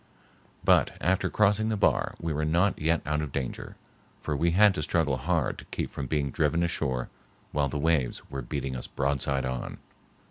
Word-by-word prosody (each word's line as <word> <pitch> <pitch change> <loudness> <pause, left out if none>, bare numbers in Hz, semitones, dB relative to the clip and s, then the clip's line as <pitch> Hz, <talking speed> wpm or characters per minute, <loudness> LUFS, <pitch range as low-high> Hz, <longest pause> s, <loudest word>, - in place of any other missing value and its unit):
But - - +3
after 90 +2 +1
crossing 105 +1 +2
the 110 - 0
bar - - +2
we 80 -1 -2
were 75 +1 -1
not 85 +6 +2
yet 80 +1 +1
out 75 +1 0
of 75 -3 -4
danger, 65 -2 -4 0.4
for 75 - -2
we 85 +5 +2
had 100 +4 +5
to 75 - -3
struggle 75 -2 +1
hard - - 0
to - - -11
keep - - -4
from 70 - -5
being 70 -1 0
driven 80 +4 +1
ashore 65 -7 -1 0.4
while 70 -2 +1
the 75 - -3
waves 75 -4 +1
were 70 -1 -5
beating 65 +1 -4
us 60 - -5
broadside 70 0 0
on. 65 -1 -4
75 Hz, 185 wpm, -28 LUFS, 70-85 Hz, 0.4 s, had